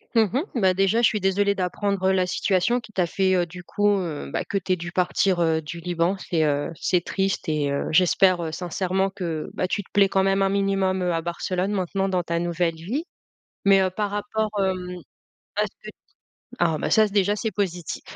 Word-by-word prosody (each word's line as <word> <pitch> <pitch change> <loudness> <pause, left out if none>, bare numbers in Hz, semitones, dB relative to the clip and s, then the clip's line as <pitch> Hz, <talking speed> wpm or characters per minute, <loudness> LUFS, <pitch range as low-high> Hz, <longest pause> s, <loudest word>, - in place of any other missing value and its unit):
Mmh 225 - +6
mh. 270 +5 +1 0.2
Bah, 190 -3 +4
déjà 195 +5 +2
je 235 - +6
suis 210 -1 -1
désolé 200 +1 +2
d'apprendre 190 +1 0
la 185 -1 +2
situation 195 +7 +1
qui 220 -1 -14
t'a 185 -4 +1
fait, 190 +2 +1
heu, 175 -1 +2
du 175 +1 -11
coup, 205 +4 0
heu, 160 - -4
bah, - - -1
que 200 - -2
tu 185 -1 0
aies - - +2
dû 175 0 -7
partir, 180 0 +1
heu, 160 -1 +2
du 160 +2 -7
Liban 175 +2 0
c'est, 165 -4 0
heu, 145 -1 0
c'est 180 +2 +1
triste 195 0 -1
et 150 -2 0
heu, 140 - -1
j'espère, 180 +2 +4
heu, 160 - -3
sincèrement 185 +3 -1
que, 170 -5 -4
bah, 185 - -1
tu 205 - -1
te - - -26
plais 200 -1 +5
quand 190 0 +2
même 195 0 +2
un 195 - +3
minimum, 195 -1 +1
heu, 180 -1 0
à 165 - 0
Barcelone 180 +3 -2
maintenant 195 0 -1
dans 180 -2 0
ta 170 0 -1
nouvelle 170 -1 0
vie. 220 - -4 0.6
Mais, 195 -1 +6
heu, 185 - +1
par 205 +2 -2
rapport, 210 +1 -2
hem 180 -1 -2 0.6
à - - +3
ce - - -1 0.2
que - - -7
t - - -14 0.6
ah, 165 -2 +2
bah, - - -2
ça 220 0 +5
c 205 - -8
déjà 205 0 +2
c'est 220 +1 -2
positif. 180 -4 -3
185 Hz, 225 wpm, -24 LUFS, 175-195 Hz, 0.6 s, Mmh